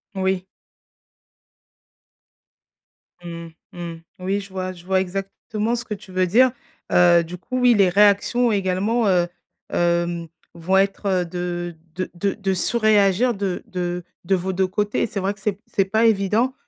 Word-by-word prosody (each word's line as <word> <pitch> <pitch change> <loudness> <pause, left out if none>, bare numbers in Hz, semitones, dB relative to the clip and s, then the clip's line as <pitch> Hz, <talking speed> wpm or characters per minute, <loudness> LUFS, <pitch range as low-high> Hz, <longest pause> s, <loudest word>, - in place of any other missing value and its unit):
Oui. 190 -1 0 2.8
Mmh. 170 -1 -7 0.3
Mmh. 175 -1 -6 0.3
Oui 190 +2 -1
je 195 0 -9
vois, 185 -1 -4
je 175 -1 -13
vois 190 0 +2
exactement 195 +4 -3
ce 240 - -4
que 230 - -5
tu 205 -1 -10
veux 185 0 +1
dire, 250 +7 +5 0.4
heu, 175 -1 +6
du 175 +2 -8
coup 255 +8 -5
oui, 250 -1 +5
les 200 -4 +4
réactions 205 +5 +4
également, 205 +4 +1
heu, 175 -2 +3 0.5
hem, 170 -1 0 0.3
vont 170 +3 +1
être 195 -1 +1
de 175 0 -4 0.2
de 185 0 -3
de 195 +3 0
de 195 -2 -1
surréagir 215 +2 +3
de 195 -3 -3
de 180 -1 -3 0.2
de 190 +2 +2
vos 185 +1 -2
2 190 +1 +1
côtés 205 +2 -1
et - - 0
c'est 205 - -4
vrai 195 +1 -1
que 205 - -22
c'est 210 +1 0
p 200 - -24
c'est 195 - +1
pas 220 +4 +2
évident 220 +4 +2
190 Hz, 160 wpm, -22 LUFS, 180-210 Hz, 2.8 s, heu